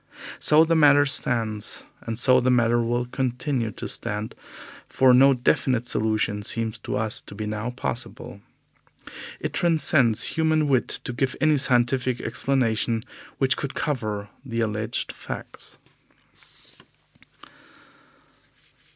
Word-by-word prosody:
So 155 +2 +5
the 165 0 +1
matter 145 -2 +5
stands, 115 -6 0 0.2
and 115 -1 -5
so 130 +1 +5
the 125 0 0
matter 120 -1 +2
will 120 +1 -1
continue 125 -1 -2
to - - -7
stand, 105 +1 -2 0.6
for 130 -1 +4
no 135 +2 +6
definite 125 -1 0
solution 110 -2 -1
seems 110 +1 0
to - - -5
us 110 -1 -1
to - - -13
be 105 +1 -5
now 105 +2 -4
possible. 125 -1 -5 1.0
It - - -4
transcends 155 -9 +3
human 160 -1 +1
wit 130 -3 +1 0.2
to 125 - -5
give 130 +1 -2
any 155 -2 +3
scientific 125 -1 +2
explanation 115 -2 -1 0.3
which 135 +2 +1
could 140 -4 -5
cover 110 -9 -3
the 115 -4 -3
alleged 110 +1 -3
facts." - - -9
125 Hz, 120 wpm, -24 LUFS, 110-135 Hz, 1.0 s, no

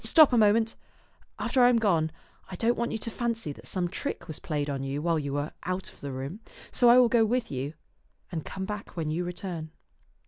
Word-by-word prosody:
Stop 310 -6 +6
a - - +5
moment. 220 +1 +4 0.6
After 260 - +1
I 245 - +8
am 245 - +4
gone, 170 -8 +2 0.4
I 185 - -6
don't 230 +6 +2
want 235 0 -1
you - - -1
to 230 +1 -4
fancy 230 -11 -2
that - - -13
some 180 -2 -1
trick 245 +10 -4
was 155 - -5
played 150 -2 -2
you 135 0 -2
while 165 +1 +1
you 140 -2 -3
were 145 +2 -2
out 185 +1 -3
of - - -22
the 140 - -4
room, 135 +9 -5
and - - -22 0.2
so 245 - +6
I 240 - +8
will 250 -1 +7
go 230 -1 +4
with 235 +2 0
you 140 +3 -3 0.6
and 160 -4 -3
come 190 0 -5
back 210 -2 -6
when 155 -2 -1
you 170 +3 -1
return." 175 -2 -5
185 Hz, 230 wpm, -28 LUFS, 155-230 Hz, 0.6 s, I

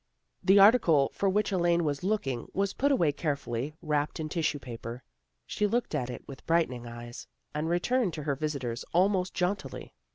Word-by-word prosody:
The 195 +1 +5
article 195 - +6
for 200 - +1
which 205 +2 +1
Elaine 175 -2 +2
was 145 0 -2
looking 140 - -1
was 195 0 0
put 280 +2 +1
away 170 - +3
carefully, 140 -3 -3
wrapped 150 0 -1
in 155 -1 -3
tissue 160 -2 0
paper. 120 -1 -8 0.4
She 210 - 0
looked 235 +4 -1
at 125 - -1
it 125 - -8
with 135 -2 -10
brightening 130 -8 +1
eyes, 120 0 -9 0.3
and 155 +2 -2
returned 190 +3 +1
to 155 - -5
her 145 -1 0
visitors 135 -5 -3
almost 185 0 +2
jauntily. 180 -6 -3
160 Hz, 170 wpm, -29 LUFS, 135-195 Hz, 0.4 s, article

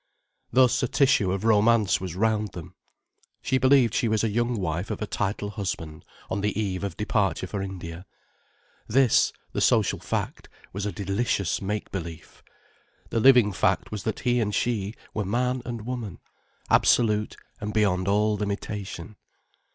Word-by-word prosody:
Thus 130 0 +4
a 130 - +1
tissue 115 -8 +3
of 95 +1 -2
romance 110 -2 +3
was 90 -3 -5
round 105 0 0
them. 85 -3 -9 0.7
She 130 - +1
believed 130 -3 +4
she 115 - +1
was 110 0 +1
a 110 - +1
young 120 +3 0
wife 90 +1 -2
of - - -3
a 105 - -2
titled 100 0 -2
husband 85 -7 -5 0.2
on 100 - -2
the 105 +1 -1
eve 95 -3 -2
of 95 -5 -4
departure 105 -3 0
for 100 +2 -4
India. 90 -2 -7 0.8
This, 130 +1 +4 0.2
the - - -2
social - - +3
fact, - - -4 0.2
was 100 +2 -3
a - - -2
delicious 100 -2 -1
make 105 +2 -3
belief. 85 -3 -7 0.7
The 115 - +1
living 125 -3 +6
fact - - 0
was 105 -2 -4
that 110 - -2
he 125 -1 +2
and 105 -2 -1
she 110 -3 -1 0.2
were 105 - -1
man 125 +5 0
and 120 -3 -5
woman, 120 -7 -5 0.5
absolute 105 -3 +3 0.2
and 105 +1 -4
beyond 100 -4 +1
all 105 +1 +2
limitation. 100 -1 -5
105 Hz, 160 wpm, -26 LUFS, 95-115 Hz, 0.8 s, living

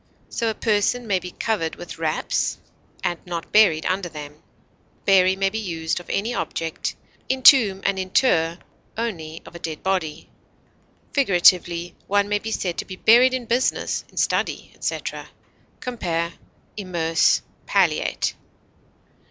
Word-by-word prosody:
So 230 -2 -1
a 220 - -3
person 220 +3 +1
may 195 -4 +1
be 180 - -7
covered 180 -4 -2
with 175 -1 -9
wraps, 160 -1 -1 0.5
and 175 - -1
not 170 -2 -6
buried 195 -8 +5
under 185 -1 -1
them. 150 -1 -9 0.6
Bury 190 -1 +5
may 195 0 0
be 220 - -3
used 165 -5 -2
of 175 - -13
any 220 +5 -1
object, 165 -3 -3 0.3
entomb 255 -7 +6
and 195 -1 +1
inter 175 -4 +2 0.4
only 165 -9 -4
of - - -13
a 170 - -9
dead 160 -2 -6
body. 185 -5 -2 0.9
Figuratively, 175 - +3
one 205 0 +2
may 205 0 0
be 220 - -5
said 180 -5 -2
to - - -3
be 185 - -8
buried 245 +6 +5
in 250 -2 -4
business, 240 +3 0
in - - -22
study, - - 0
etc. - - -4 0.5
Compare 170 -9 -2 0.4
IMMERSE; 170 -5 +2 0.2
PALLIATE. - - +1
185 Hz, 135 wpm, -23 LUFS, 165-215 Hz, 0.9 s, entomb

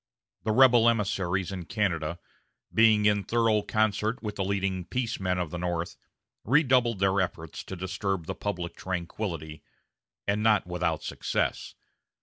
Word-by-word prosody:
The 110 - +2
rebel 120 -1 +6
emissaries 95 -5 0
in 90 -3 -5
Canada, 85 -5 -1 0.6
being 110 -2 +5
in 105 -1 +3
thorough 115 -2 +2
concert 110 +3 0
with 105 -1 -4
the 95 - -1
leading 95 -1 -1
peace 120 +1 -2
men 90 -1 0
of 90 -4 -2
the 85 - -4
North, 85 -1 -2 0.5
redoubled 125 -3 +3
their 95 0 +2
efforts 80 -3 -4
to 95 - -6
disturb 95 -1 -3
the - - -3
public 90 -4 -4
tranquility, 85 -4 -4 0.7
and 100 +1 +1
not 110 -1 +3
without 90 -2 -2
success. - - -2
100 Hz, 140 wpm, -28 LUFS, 90-110 Hz, 0.7 s, rebel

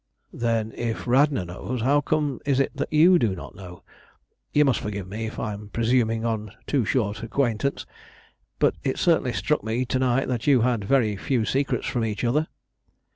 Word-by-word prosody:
"Then, 115 -2 -1
if 115 -1 -3
Radna 130 -4 +3
knows, 110 +7 -5
how 145 +3 +3
comes 145 -3 -1
it 135 -1 +1
that - - -3
you 170 +4 +6
do 105 -8 +1
not 75 -5 -9
know? 90 -2 -11 0.7
You 150 0 +4
must 135 -4 +2
forgive 100 -3 -5
me 110 +4 -4
if - - -8
I 105 -2 -3
am 105 0 -9
presuming 115 0 +1
on 110 -2 -2
a - - -18
too 135 -6 +1
short 105 -3 -1
acquaintance; 120 +2 -1 0.7
but - - +3
it - - -1
certainly - - +2
struck - - 0
me 115 +4 -1
to 130 +1 -1
night 130 +1 +1
that 120 -1 -3
you 135 -4 +5
had 120 -3 +1
very 110 -3 +2
few 120 +2 0
secrets 140 +4 0
from 120 - -1
each 110 0 -3
other." 150 +7 +1
120 Hz, 185 wpm, -24 LUFS, 110-135 Hz, 0.7 s, you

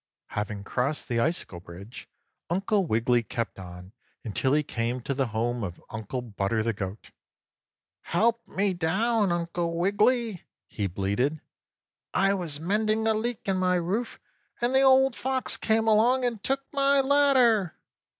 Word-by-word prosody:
4. - - -12
Having 105 -1 -3
crossed 130 +8 -1
the 120 -1 0
icicle 140 - -1
bridge, 90 +6 -11 0.4
Uncle 195 +2 +1
Wiggily 120 +1 +2
kept 115 -3 -4
on 90 +1 -10 0.3
until 125 +4 -1
he 150 0 +3
came 120 -1 -2
to 130 +3 -3
the 135 -1 0
home 115 +2 -2
of 90 -3 -5
Uncle 110 +3 -5
Butter 110 -1 -1
the 115 0 0
goat. 100 +1 -7 0.9
"Help 230 +6 +1
me 195 0 0
down, 195 +5 +1
Uncle 170 0 -2
Wiggily!" 210 +2 +1 0.2
he 105 -3 -3
bleated. 100 - -1 0.8
"I 195 +1 +3
was 170 -7 -2
mending 215 +5 0
a 220 - +4
leak 225 +1 -3
in 190 -1 +1
my 185 0 +2
roof, 190 +7 -2 0.4
and 240 +2 0
the 265 - +5
Old 265 -1 +5
Fox 260 0 0
came 220 0 +1
along 240 +4 +4
and 230 -4 -3
took 270 +1 -1
my 280 0 +3
ladder." 265 - +4
175 Hz, 150 wpm, -27 LUFS, -, 0.9 s, the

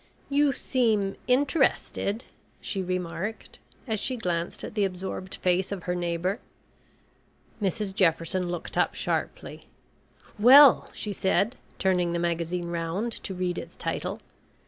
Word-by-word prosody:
"You 285 0 +4
seem 220 -7 +1
interested," 260 -4 +1 0.3
she 195 - -3
remarked, 185 +3 -4 0.3
as 220 -2 0
she 255 - -1
glanced 175 -5 -2
at - - -6
the 210 -2 +1
absorbed 190 0 -4
face 180 +1 +1
of 195 -4 -4
her 180 - -1
neighbour. 175 +4 -1 1.2
Mrs 200 0 -1
Jefferson 175 0 +1
looked 175 -2 -3
up - - +2
sharply. - - -3 0.7
"Well," 265 +5 +8
she 210 - -4
said, 200 +5 +1 0.2
turning 180 -2 +1
the - - 0
magazine 170 0 -1
round 170 +7 -2
to 190 - -5
read 180 -1 -1
its - - -10
title. - - -3
190 Hz, 125 wpm, -27 LUFS, 175-220 Hz, 1.2 s, Well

